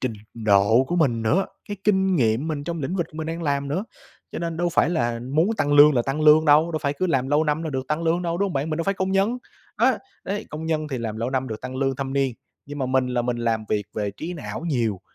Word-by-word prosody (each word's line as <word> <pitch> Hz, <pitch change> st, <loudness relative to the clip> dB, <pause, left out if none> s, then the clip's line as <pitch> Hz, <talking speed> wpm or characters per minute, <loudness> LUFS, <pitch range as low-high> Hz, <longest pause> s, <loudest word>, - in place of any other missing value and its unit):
trình 130 Hz, -3 st, -1 dB, 0.2 s
độ 110 Hz, +2 st, +4 dB
của 175 Hz, +6 st, -2 dB
mình 125 Hz, -9 st, +2 dB
nữa, 170 Hz, -, +2 dB, 0.2 s
cái 205 Hz, -, -4 dB
kinh 190 Hz, -2 st, +3 dB
nghiệm 120 Hz, +2 st, +1 dB
mình 145 Hz, -3 st, -3 dB
trong 170 Hz, +1 st, -4 dB
lĩnh 160 Hz, +7 st, -2 dB
vực 170 Hz, -3 st, -1 dB
mình 160 Hz, 0 st, -4 dB
đang 165 Hz, +1 st, -4 dB
làm 140 Hz, -2 st, -1 dB
nữa. 180 Hz, +9 st, -2 dB, 0.5 s
Cho -, -, -4 dB
nên 165 Hz, -1 st, -3 dB
đâu 175 Hz, +1 st, 0 dB
phải 170 Hz, 0 st, +2 dB
là 120 Hz, -8 st, -1 dB
muốn 160 Hz, +6 st, +3 dB
tăng 145 Hz, -7 st, +1 dB
lương 145 Hz, +1 st, +8 dB
là 120 Hz, -, +2 dB
tăng 135 Hz, +5 st, -2 dB
lương 155 Hz, +1 st, +6 dB
đâu, 155 Hz, +3 st, +4 dB
đâu 155 Hz, -, 0 dB
phải 140 Hz, -2 st, +1 dB
cứ 165 Hz, +6 st, -1 dB
làm 135 Hz, -6 st, 0 dB
lâu 150 Hz, +2 st, +3 dB
năm 150 Hz, +1 st, 0 dB
là 160 Hz, -, -3 dB
được 130 Hz, -1 st, -3 dB
tăng 150 Hz, +2 st, -1 dB
lương 170 Hz, +2 st, +1 dB
đâu, 170 Hz, -1 st, -2 dB
đúng 200 Hz, -, +2 dB
hông -, -, -6 dB
bạn? 140 Hz, +2 st, -2 dB
Mình 155 Hz, -, -1 dB
đâu 165 Hz, -, -2 dB
phải 195 Hz, -, +1 dB
công 190 Hz, 0 st, -1 dB
nhân. 200 Hz, +6 st, +1 dB, 0.4 s
Á, -, -, +3 dB, 0.3 s
đấy, 200 Hz, +2 st, -3 dB
công 155 Hz, +2 st, -5 dB
nhân 155 Hz, -1 st, -1 dB
thì 135 Hz, -3 st, -3 dB
làm 110 Hz, -2 st, -4 dB
lâu 115 Hz, +3 st, -2 dB
năm 130 Hz, 0 st, -1 dB
được 110 Hz, -1 st, -6 dB
tăng 130 Hz, +1 st, -6 dB
lương 135 Hz, -1 st, 0 dB
thâm 135 Hz, 0 st, -4 dB
niên, 135 Hz, -3 st, 0 dB, 0.3 s
nhưng 145 Hz, +1 st, -7 dB
mà 130 Hz, -, -1 dB
mình 130 Hz, 0 st, +1 dB
là 125 Hz, -1 st, -1 dB
mình 120 Hz, 0 st, -1 dB
làm 115 Hz, -2 st, -1 dB
việc 105 Hz, -2 st, -1 dB
về 105 Hz, -1 st, -2 dB
trí 160 Hz, -, -6 dB
não 160 Hz, -, -6 dB
nhiều, 115 Hz, -, 0 dB
145 Hz, 280 wpm, -23 LUFS, 125-165 Hz, 0.5 s, lương